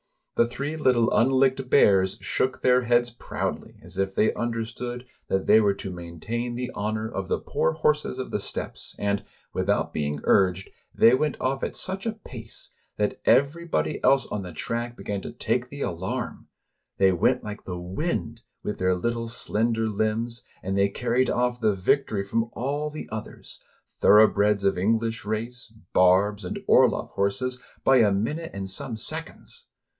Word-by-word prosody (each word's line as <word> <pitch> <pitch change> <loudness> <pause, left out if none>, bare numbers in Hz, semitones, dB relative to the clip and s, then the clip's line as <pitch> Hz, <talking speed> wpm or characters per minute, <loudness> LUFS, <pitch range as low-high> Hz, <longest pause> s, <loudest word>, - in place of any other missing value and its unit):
The 120 - +3
three 140 +5 -4
little 125 -6 +2
unlicked 130 +1 +3
bears 95 -8 +4
shook 130 0 -1
their 125 0 +4
heads 120 0 +3
proudly, 120 - -4
as 90 +2 -6
if 95 0 -1
they 110 - +3
understood 120 +1 -4 0.2
that 95 0 0
they 110 - +6
were 100 -2 +2
to 95 -1 -6
main 85 -2 -9
tain 120 +6 -3
the 125 +1 -4
honor 110 +1 -2
of 95 -4 -4
the - - +1
poor - - 0
horse 150 -1 +2
of 130 0 -5
the - - 0
steppes, - - -5
and, 100 -1 -1 0.3
without - - 0
being 75 0 -2
urged, 95 -1 +2 0.2
they 115 - +6
went 150 +3 +1
off 135 +1 -1
at - - -3
such 190 +3 -3
a 225 - 0
pace 120 - -9 0.2
that 105 0 -1
everybody 145 +8 +2
else 135 0 +5
on 105 - -4
the 90 -2 -7
track 120 +8 -3
began 100 -1 -4
to - - -7
take - - -1
the - - -8
alarm; - - -4 0.5
they 95 -1 +5
went 125 +8 +2
Hke 105 -1 -7
the 90 -1 -4
wind, 95 - -3 0.2
with 105 - -4
their 90 0 +2
little, 115 +5 -2
slender 115 0 +1
limbs, 110 +3 -1 0.2
and 95 +1 -2
they 100 0 +3
carried 125 +4 0
off 125 0 0
the 105 -2 +2
victory 100 +2 +1
from 115 +3 -1
all 145 +4 -2
the 155 +1 -7
others, 110 0 -8 0.2
— - - -39
thoroughbreds 105 -1 +5
of 95 -2 +2
English 115 +3 0
race, 115 +2 -4 0.2
barbs, 95 +3 +4
and 90 - -4
Orloff - - +4
horses, 125 +6 -1
— - - -30
by 135 - +6
a 110 -4 +5
minute 145 +12 -1
and 95 -1 -4
some 110 +5 -3
seconds - - -5
115 Hz, 170 wpm, -25 LUFS, 100-125 Hz, 0.5 s, they